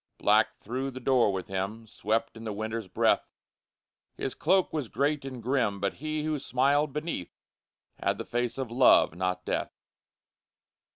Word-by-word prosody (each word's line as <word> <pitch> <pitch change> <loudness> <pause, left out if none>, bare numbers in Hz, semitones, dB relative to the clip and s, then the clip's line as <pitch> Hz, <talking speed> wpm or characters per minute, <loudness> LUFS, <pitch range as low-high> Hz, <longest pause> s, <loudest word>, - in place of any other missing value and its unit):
_ - - -50
Black - - +3
through 130 +5 -3
the 130 -1 -7
door 125 -4 +3
with 95 -1 -3
him 100 +4 -3
Swept 110 +2 -1
in 115 - -9
the 110 - -3
Winter's 110 0 -4
breath; - - +2 0.9
His - - -3
cloak 190 -3 +2
was 145 -8 -2
great 145 +1 0
and 130 -4 -7
grim 115 -5 +1
But 100 0 -1
he, 155 0 -2
who 155 -1 -1
smiled 140 +3 +2
beneath, 150 - -4 0.6
Had - - +1
the - - -5
face 120 +1 -1
of 130 -4 -4
Love 125 -9 +5
not 90 +1 -2
Death. - - -2
120 Hz, 165 wpm, -28 LUFS, 105-140 Hz, 0.9 s, Love